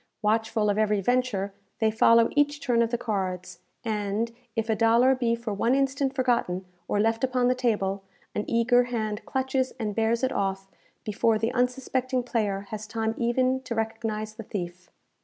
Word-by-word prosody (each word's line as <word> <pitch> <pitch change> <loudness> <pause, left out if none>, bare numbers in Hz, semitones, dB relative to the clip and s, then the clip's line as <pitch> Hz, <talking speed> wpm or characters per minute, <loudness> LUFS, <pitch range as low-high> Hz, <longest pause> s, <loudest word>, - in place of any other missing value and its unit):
Watchful 215 0 +2
of 205 - -1
every 210 -1 +2
venture, 205 -3 0 0.2
they 220 -1 +2
follow 230 +1 +5
each 290 0 +2
turn 240 -4 +2
of 230 - +2
the 240 - 0
cards, 190 -6 -3 0.3
and, 215 +1 -1 0.2
if 225 -1 -1
a 220 - +2
dollar 230 +4 +5
be 240 -3 +1
for 230 -2 -4
one 230 +5 +2
instant 275 0 0
forgotten 235 -8 0 0.2
or 205 - 0
left 225 +3 +1
upon 250 -1 +2
the - - +4
table, 205 -6 0 0.3
an 210 - -1
eager 245 +1 +3
hand 215 -3 -3
clutches 265 0 0
and 215 -3 -2
bears 225 +3 +1
it 260 - +2
off 195 -1 -2 0.3
before 215 +1 +1
the 225 +2 0
unsuspecting 255 0 0
player 210 -5 -1
has 215 0 -5
time 220 0 -1
even 255 +2 +1
to 250 -2 -5
recognize 220 -1 -3
the 220 - -8
thief. 180 -3 -6
225 Hz, 175 wpm, -26 LUFS, 210-250 Hz, 0.3 s, follow